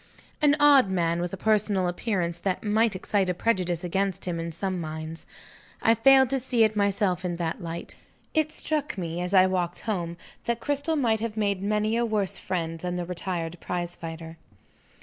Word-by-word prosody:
An 295 Hz, -1 st, +5 dB
odd 285 Hz, -7 st, +6 dB
man, 170 Hz, -2 st, 0 dB
with 175 Hz, 0 st, -2 dB
a 195 Hz, -, -5 dB
personal 205 Hz, -2 st, +2 dB
appearance 175 Hz, -2 st, -1 dB
that 185 Hz, 0 st, -2 dB
might 220 Hz, 0 st, +2 dB
excite 190 Hz, 0 st, 0 dB
a 180 Hz, -, 0 dB
prejudice 180 Hz, -5 st, 0 dB
against 190 Hz, +1 st, -1 dB
him, 175 Hz, -2 st, -2 dB
in 165 Hz, 0 st, -4 dB
some 185 Hz, +2 st, -3 dB
minds. 160 Hz, +1 st, -6 dB, 0.5 s
I 225 Hz, -, +4 dB
failed 265 Hz, +3 st, +6 dB
to 270 Hz, -, +2 dB
see 245 Hz, -2 st, +2 dB
it 215 Hz, -1 st, +2 dB
myself 200 Hz, -3 st, +1 dB
in 175 Hz, -1 st, -2 dB
that 170 Hz, -1 st, -3 dB
light. 170 Hz, 0 st, -6 dB, 0.4 s
It 310 Hz, -1 st, +1 dB
struck 300 Hz, -4 st, -2 dB
me, 170 Hz, -1 st, -3 dB
as 180 Hz, 0 st, -2 dB
I 185 Hz, 0 st, +7 dB
walked 180 Hz, -2 st, -1 dB
home, 175 Hz, -6 st, -3 dB, 0.3 s
that 235 Hz, 0 st, -1 dB
Cristel 285 Hz, +5 st, 0 dB
might 230 Hz, -7 st, +2 dB
have 225 Hz, -1 st, -4 dB
made 200 Hz, -3 st, 0 dB
many 215 Hz, +2 st, +1 dB
a 240 Hz, -, +2 dB
worse 215 Hz, -4 st, 0 dB
friend 165 Hz, -3 st, -3 dB
than 180 Hz, +1 st, -3 dB
the 175 Hz, -1 st, -2 dB
retired 175 Hz, -1 st, -4 dB
prize 175 Hz, -1 st, -3 dB
fighter. 165 Hz, -1 st, -8 dB
190 Hz, 190 wpm, -26 LUFS, 175-220 Hz, 0.5 s, I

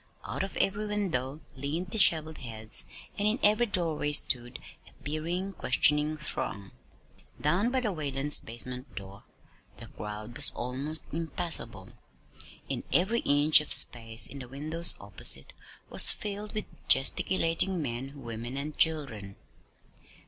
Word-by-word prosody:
Out -, -, -4 dB
of 195 Hz, -, -5 dB
every 205 Hz, +2 st, -1 dB
window 160 Hz, -9 st, -2 dB
leaned 155 Hz, +7 st, -5 dB
disheveled 160 Hz, -7 st, +3 dB
heads, 110 Hz, -3 st, -1 dB, 0.3 s
and 205 Hz, -, +1 dB
in 215 Hz, +3 st, 0 dB
every 215 Hz, +3 st, +3 dB
doorway 165 Hz, -6 st, -1 dB
stood 120 Hz, -4 st, +3 dB, 0.3 s
a -, -, -26 dB
peering, 170 Hz, +6 st, -4 dB
questioning 150 Hz, -1 st, +2 dB
throng. 100 Hz, -9 st, -6 dB, 0.7 s
Down 175 Hz, +10 st, +1 dB
by 260 Hz, +1 st, -1 dB
the 215 Hz, -5 st, -2 dB
Whalens' 145 Hz, -2 st, +1 dB
basement 125 Hz, +3 st, -8 dB
door, 100 Hz, 0 st, -11 dB, 0.5 s
the -, -, -12 dB
crowd 105 Hz, +2 st, -9 dB
was -, -, +6 dB
almost 140 Hz, +6 st, -5 dB
impassable; 160 Hz, -, -2 dB, 0.8 s
and -, -, -4 dB
every 205 Hz, +7 st, +1 dB
inch 145 Hz, -1 st, +4 dB
of 150 Hz, -, -6 dB
space 115 Hz, -1 st, +4 dB
in 140 Hz, -, -2 dB
the 125 Hz, -, -9 dB
windows 155 Hz, +6 st, +3 dB
opposite 100 Hz, -9 st, +1 dB, 0.4 s
was -, -, +7 dB
filled 210 Hz, 0 st, -2 dB
with 215 Hz, -, -4 dB, 0.2 s
gesticulating 165 Hz, +6 st, +2 dB
men, 135 Hz, 0 st, -6 dB
women, 115 Hz, +3 st, -7 dB
and 150 Hz, +2 st, -5 dB
children. 130 Hz, -12 st, 0 dB
150 Hz, 130 wpm, -28 LUFS, 120-175 Hz, 0.8 s, was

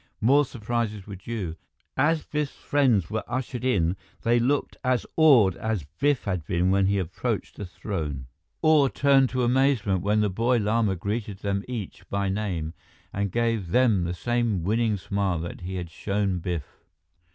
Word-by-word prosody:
More 140 Hz, +6 st, +4 dB
surprises 115 Hz, -4 st, -3 dB
were 100 Hz, -, -7 dB
due. 95 Hz, -4 st, -5 dB, 0.4 s
As 155 Hz, +3 st, +2 dB
Biff's 150 Hz, -2 st, -2 dB
friends 125 Hz, -, +2 dB
were 110 Hz, -, -1 dB
ushered 125 Hz, -1 st, -3 dB
in, 95 Hz, -9 st, +2 dB, 0.3 s
they 120 Hz, +1 st, +3 dB
looked 135 Hz, +4 st, 0 dB
as 125 Hz, -2 st, +1 dB
awed 130 Hz, -, +6 dB
as 110 Hz, -8 st, -2 dB
Biff 145 Hz, -2 st, +2 dB
had 90 Hz, -5 st, -2 dB
been 90 Hz, +4 st, +1 dB
when 95 Hz, 0 st, +3 dB
he 100 Hz, +1 st, +2 dB
approached 100 Hz, +5 st, -3 dB
the 100 Hz, -, -6 dB
throne. 80 Hz, -9 st, -4 dB, 0.4 s
Awe 155 Hz, -3 st, +5 dB
turned 135 Hz, -1 st, +3 dB
to 130 Hz, -1 st, -1 dB
amazement 120 Hz, -7 st, +2 dB
when 105 Hz, +2 st, +2 dB
the 105 Hz, -, +2 dB
boy 120 Hz, +6 st, +2 dB
Lama 110 Hz, -2 st, +1 dB
greeted 100 Hz, +2 st, -4 dB
them 100 Hz, -1 st, -1 dB
each 105 Hz, -6 st, -6 dB
by 100 Hz, -1 st, 0 dB
name 95 Hz, -6 st, -2 dB, 0.4 s
and 100 Hz, -1 st, -1 dB
gave 115 Hz, -4 st, 0 dB
them 110 Hz, -3 st, +3 dB
the 85 Hz, +1 st, -2 dB
same 120 Hz, -3 st, 0 dB
winning 110 Hz, +2 st, +1 dB
smile 100 Hz, -1 st, -1 dB
that 85 Hz, +1 st, -6 dB
he 95 Hz, +2 st, -5 dB
had 90 Hz, -2 st, -5 dB
shown 100 Hz, 0 st, -1 dB
Biff. 85 Hz, -5 st, -5 dB
105 Hz, 165 wpm, -26 LUFS, 95-125 Hz, 0.4 s, awed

